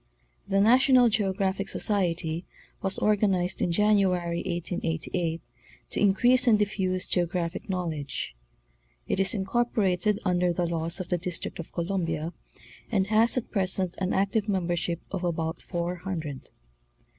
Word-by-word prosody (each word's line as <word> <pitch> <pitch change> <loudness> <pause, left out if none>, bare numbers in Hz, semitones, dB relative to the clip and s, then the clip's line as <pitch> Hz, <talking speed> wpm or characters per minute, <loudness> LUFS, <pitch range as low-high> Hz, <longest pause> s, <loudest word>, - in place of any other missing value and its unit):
The 195 - +1
Nationat 250 +3 +5
GroGRAPHic 195 -1 -1
Socrery 170 -5 0 0.4
was 195 0 +1
organized 195 -3 +1
in 175 - +1
January, 185 -3 +2
1888, 170 -1 -2 0.3
'' - - -27
to - - -2
increase 240 +6 +4
and 220 -3 +6
diffuse 190 -3 -1
geographic 175 +1 -1
knowledge." 160 - -3 0.7
It - - 0
is 195 +3 +3
in 190 -2 -2
corporated 210 -3 +1
under 180 -1 +2
the 175 +1 0
laws 170 +1 -2
of 185 - -5
the 180 - 0
District 180 0 -5
of 170 - -7
Columbia, 170 -2 -2 0.6
and 195 -4 +2
has 225 +3 +4
at 250 - -3
present 185 -2 +1
an 190 -1 -1
active 200 +2 0
membership 175 -3 -1
of 190 -2 -3
about 165 -1 -2
four 175 +1 -3
hundred. 165 -7 -5
185 Hz, 135 wpm, -27 LUFS, 170-200 Hz, 0.7 s, and